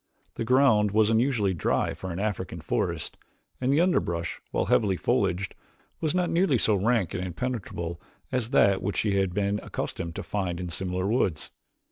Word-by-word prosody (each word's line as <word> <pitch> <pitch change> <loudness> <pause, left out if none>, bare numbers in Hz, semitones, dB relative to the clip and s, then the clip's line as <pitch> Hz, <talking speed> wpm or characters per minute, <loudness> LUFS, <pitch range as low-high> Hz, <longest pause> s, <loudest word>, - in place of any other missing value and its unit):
The - - -3
ground 115 -4 +4
was 110 0 +4
unusually 115 -4 +2
dry 85 - 0
for 95 - -6
an 85 - -5
African 95 -4 -3
forest 75 - -2 0.4
and 130 +1 +2
the 145 - +3
underbrush, 85 - 0
while - - 0
heavily 100 -4 +2
foliaged, 90 +3 0 0.5
was 160 +1 -1
not 180 -1 +2
nearly 170 -6 +3
so 110 - +3
rank 105 -1 +1
and 90 - -2
impenetrable 90 -4 -4 0.3
as 125 -3 -1
that 100 -8 +4
which 100 - -2
she 100 -2 +2
had 95 -2 +1
been 100 +2 0
accustomed 85 0 -5
to - - -4
find 90 -4 -2
in 90 -1 -4
similar 90 +1 -2
woods. 100 -7 0
100 Hz, 170 wpm, -27 LUFS, 90-120 Hz, 0.5 s, ground